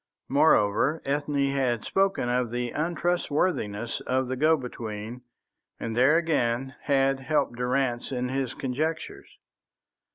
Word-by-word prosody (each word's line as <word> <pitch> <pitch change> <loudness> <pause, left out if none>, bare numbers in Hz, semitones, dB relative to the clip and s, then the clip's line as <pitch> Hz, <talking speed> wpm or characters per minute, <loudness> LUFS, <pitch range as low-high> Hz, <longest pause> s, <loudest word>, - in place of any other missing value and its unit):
Moreover, 140 0 +3
Ethne 140 0 0
had 125 -5 0
spoken 195 -9 +1
of 125 -1 0
the 120 0 -2
untrustworthiness 155 - -1
of 130 0 0
the 130 - -1
go 155 +4 +4
between, 115 -2 -6 0.6
and 115 -1 -4
there 130 +6 +5
again 135 -6 0
had 135 -1 +2
helped 135 -2 0
Durrance 125 0 -1
in 125 -1 -1
his 130 -1 -2
conjectures. 155 +5 -3
130 Hz, 120 wpm, -27 LUFS, 120-150 Hz, 0.6 s, there